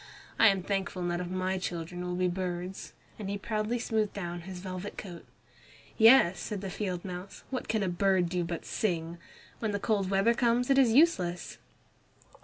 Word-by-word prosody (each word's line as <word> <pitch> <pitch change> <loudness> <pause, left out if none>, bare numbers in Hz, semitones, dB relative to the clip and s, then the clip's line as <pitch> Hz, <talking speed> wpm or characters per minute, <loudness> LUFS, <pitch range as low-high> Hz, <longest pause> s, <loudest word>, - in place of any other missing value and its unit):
I 225 - +8
am 195 -3 +3
thankful 195 -1 -2
none 175 0 -1
of 175 - -5
my 185 +1 -1
children 175 0 -4
will 180 0 -3
be 180 0 +1
birds," 180 0 -4 0.3
and 200 -2 -4
he 200 - -2
proudly 215 +3 -1
smoothed 220 -3 -1
down 175 -3 -5
his 185 - -6
velvet 185 +2 -6
coat. 175 -8 -8 0.7
"Yes," 225 -7 +6
said 205 0 -4
the 195 -2 -5
field 185 -3 -3
mouse; 185 +1 -7
"what 255 - -3
can 220 -2 0
a - - 0
bird 185 0 +2
do 175 0 -1
but 170 0 -5
sing? 170 -4 -2 0.4
When 220 -2 -1
the 205 - -1
cold 200 -3 0
weather 195 +4 +3
comes 240 +2 +2
it 270 - +5
is 250 -4 +5
useless." 185 - +2
190 Hz, 185 wpm, -30 LUFS, 180-215 Hz, 0.7 s, I